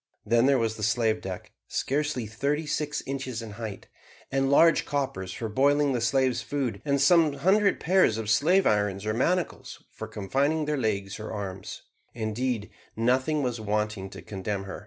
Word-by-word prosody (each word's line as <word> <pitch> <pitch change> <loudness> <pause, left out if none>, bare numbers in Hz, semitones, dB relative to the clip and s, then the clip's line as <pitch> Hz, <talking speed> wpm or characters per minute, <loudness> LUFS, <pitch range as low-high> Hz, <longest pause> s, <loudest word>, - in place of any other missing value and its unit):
Then 115 +3 +3
there 140 -1 +4
was 115 -2 -1
the - - -8
slave 110 +1 +1
deck, 95 -1 -7 0.2
scarcely 145 -3 -1
thirty 140 +8 -1
six 150 0 -2
inches 130 -4 -4
in 110 - -8
height, 110 -1 -7 0.5
and 135 0 +1
large 165 +4 +5
coppers 130 -10 -3
for 115 - -4
boiling 140 +5 +2
the 120 - -1
slaves' 130 +2 +2
food, 130 -8 -3
and 140 -1 +1
some 155 +1 +5
hundred 200 +6 +2
pairs 180 - +3
of 110 -1 -4
slave 170 - +3
irons 105 -1 +1
or 110 - 0
manacles 175 +10 -1
for - - -7
confining 140 +10 0
their 150 0 0
legs 105 -5 -2
or 110 - -6
arms; 95 -3 -6 0.3
indeed, 115 0 -2 0.2
nothing 130 +6 +1
was 120 -3 -2
wanting 105 -2 -2
to - - -10
condemn 100 0 -4
her. 95 - -7
120 Hz, 170 wpm, -27 LUFS, 105-145 Hz, 0.5 s, large